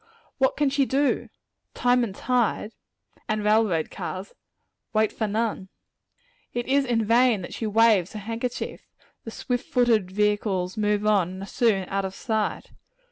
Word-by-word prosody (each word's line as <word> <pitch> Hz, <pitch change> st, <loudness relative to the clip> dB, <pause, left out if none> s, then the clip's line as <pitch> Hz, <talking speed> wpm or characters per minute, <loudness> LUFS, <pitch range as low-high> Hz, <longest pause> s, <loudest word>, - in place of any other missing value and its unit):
What 265 Hz, -1 st, +2 dB
can 290 Hz, -2 st, +2 dB
she 280 Hz, 0 st, +2 dB
do? 275 Hz, +1 st, +1 dB, 0.5 s
"Time 245 Hz, 0 st, +3 dB
and 200 Hz, -5 st, -4 dB
tide," 235 Hz, -3 st, 0 dB, 0.6 s
and 215 Hz, -1 st, 0 dB
railroad 210 Hz, -7 st, +2 dB
cars, 185 Hz, +2 st, -6 dB, 0.6 s
"wait 215 Hz, -1 st, +2 dB
for 220 Hz, -, -2 dB
none." 210 Hz, -2 st, -2 dB, 0.9 s
It 240 Hz, 0 st, -1 dB
is 275 Hz, +1 st, +3 dB
in 230 Hz, -3 st, +1 dB
vain 230 Hz, -2 st, +3 dB
that -, -, -7 dB
she 225 Hz, -, -3 dB
waves 215 Hz, -4 st, +3 dB
her 215 Hz, -, -5 dB
handkerchief; 230 Hz, +4 st, -4 dB, 0.4 s
the -, -, -5 dB
swift 245 Hz, +2 st, -3 dB
footed 230 Hz, -6 st, +3 dB
vehicles 205 Hz, -2 st, 0 dB
move 210 Hz, -1 st, 0 dB
on, 200 Hz, -5 st, +3 dB
and 190 Hz, +1 st, -7 dB
are -, -, -5 dB
soon 200 Hz, -3 st, +1 dB
out 195 Hz, 0 st, -1 dB
of 190 Hz, 0 st, -5 dB
sight! 220 Hz, -3 st, -2 dB
215 Hz, 155 wpm, -25 LUFS, 200-240 Hz, 0.9 s, Time